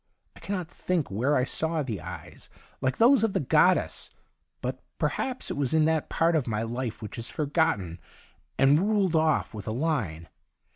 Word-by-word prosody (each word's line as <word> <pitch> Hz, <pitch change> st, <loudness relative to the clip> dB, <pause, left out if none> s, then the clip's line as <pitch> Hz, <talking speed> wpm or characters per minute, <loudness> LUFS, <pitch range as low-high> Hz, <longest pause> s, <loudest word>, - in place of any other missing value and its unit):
I -, -, -14 dB
cannot 185 Hz, -4 st, -4 dB
think 175 Hz, -, -2 dB
where 125 Hz, +9 st, +1 dB
I 125 Hz, -, +3 dB
saw 160 Hz, +3 st, 0 dB
the 110 Hz, -, -4 dB
eyes -, -, -9 dB, 0.3 s
like 130 Hz, -1 st, 0 dB
those 240 Hz, +1 st, +5 dB
of 220 Hz, -3 st, +1 dB
the -, -, +1 dB
goddess, 155 Hz, +6 st, +2 dB, 0.5 s
but -, -, -4 dB, 0.2 s
per -, -, +1 dB
haps 255 Hz, -1 st, -2 dB
it -, -, -4 dB
was 140 Hz, +1 st, +1 dB
in 155 Hz, -1 st, +4 dB
that 160 Hz, -1 st, 0 dB
part 165 Hz, +1 st, +2 dB
of 145 Hz, -6 st, 0 dB
my 110 Hz, -1 st, -1 dB
life 120 Hz, 0 st, -4 dB
which 105 Hz, -, -6 dB
is 115 Hz, -, -3 dB
forgotten 140 Hz, -, 0 dB, 0.6 s
and 140 Hz, +3 st, +5 dB
ruled 195 Hz, -3 st, +1 dB
off 155 Hz, -1 st, +2 dB
with 105 Hz, -1 st, -7 dB
a -, -, -1 dB
line. 115 Hz, -, -2 dB
150 Hz, 185 wpm, -27 LUFS, 115-165 Hz, 0.6 s, those